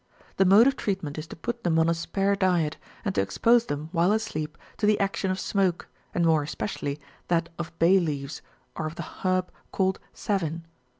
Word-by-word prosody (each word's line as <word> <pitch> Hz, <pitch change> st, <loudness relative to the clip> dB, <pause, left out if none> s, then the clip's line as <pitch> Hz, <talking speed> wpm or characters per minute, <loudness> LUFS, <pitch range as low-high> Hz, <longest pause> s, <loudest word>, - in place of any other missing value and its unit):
The 195 Hz, -, +5 dB
mode 200 Hz, +5 st, +7 dB
of 275 Hz, 0 st, +3 dB
treatment 180 Hz, -, -3 dB
is 155 Hz, -, -7 dB
to -, -, -9 dB
put 235 Hz, +7 st, -5 dB
them 165 Hz, -2 st, +2 dB
on 160 Hz, 0 st, +4 dB
a 170 Hz, -, +3 dB
spare 195 Hz, +4 st, 0 dB
diet, 175 Hz, -5 st, +1 dB, 0.3 s
and 200 Hz, -, 0 dB
to -, -, +2 dB
ex 100 Hz, 0 st, -4 dB
pose 235 Hz, 0 st, +4 dB
them, 145 Hz, +2 st, -4 dB
while 175 Hz, +2 st, +3 dB
asleep, 165 Hz, -8 st, -2 dB, 0.2 s
to 210 Hz, -, +1 dB
the 210 Hz, -1 st, +4 dB
action 195 Hz, -1 st, 0 dB
of 185 Hz, 0 st, -1 dB
smoke, 190 Hz, -4 st, 0 dB, 0.3 s
and 170 Hz, -, +2 dB
more 160 Hz, -2 st, +4 dB
es 145 Hz, -, -5 dB
pecially 145 Hz, -8 st, -3 dB, 0.3 s
that 170 Hz, -1 st, +1 dB
of 170 Hz, -, -4 dB
bay 180 Hz, +4 st, +5 dB
leaves 145 Hz, -4 st, -3 dB, 0.3 s
or 155 Hz, -, -2 dB
of 155 Hz, -, -7 dB
the 170 Hz, -, -5 dB
herb 185 Hz, +2 st, -1 dB, 0.2 s
called 190 Hz, -1 st, +1 dB
savin. 170 Hz, -5 st, -2 dB
175 Hz, 205 wpm, -26 LUFS, 160-195 Hz, 0.3 s, mode